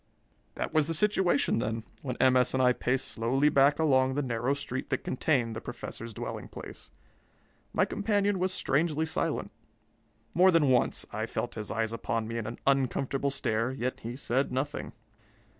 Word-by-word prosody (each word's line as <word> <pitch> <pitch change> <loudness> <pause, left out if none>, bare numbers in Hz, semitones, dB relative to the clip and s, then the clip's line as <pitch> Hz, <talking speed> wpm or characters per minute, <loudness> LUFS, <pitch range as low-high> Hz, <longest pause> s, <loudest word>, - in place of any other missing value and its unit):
That - - -3
was 155 -2 +3
the 165 - 0
situation, 185 - +2
then, 115 0 -2 0.2
when 125 -3 -4
M. 130 -1 +4
S. 125 0 +3
and 130 - +2
I 125 0 +5
paced 130 +2 0
slowly 130 +6 +2
back 140 0 +4
along 130 -4 +3
the 145 - 0
narrow 125 +2 0
street 135 -2 -5
that - - -1
contained 125 -4 0
the 110 - -5
Professor's 115 -1 -7
dwelling - - -6
place. - - -9 0.8
My - - +2
companion 205 -2 0
was 185 +1 +1
strangely 160 -2 +1
silent. 160 - -2 0.8
More 185 +2 +6
than 165 -6 +4
once 125 -2 +2
I - - -2
felt - - -3
his 105 -2 -5
eyes 115 0 -1
upon 115 -1 -2
me 115 +1 -3
in 110 - -4
an 115 - -6
uncomfortable 135 0 +1
stare, 115 -3 0
yet 130 -1 -3
he 120 +2 -6
said 135 0 0
nothing. 135 +3 -3
130 Hz, 175 wpm, -29 LUFS, 120-145 Hz, 0.8 s, More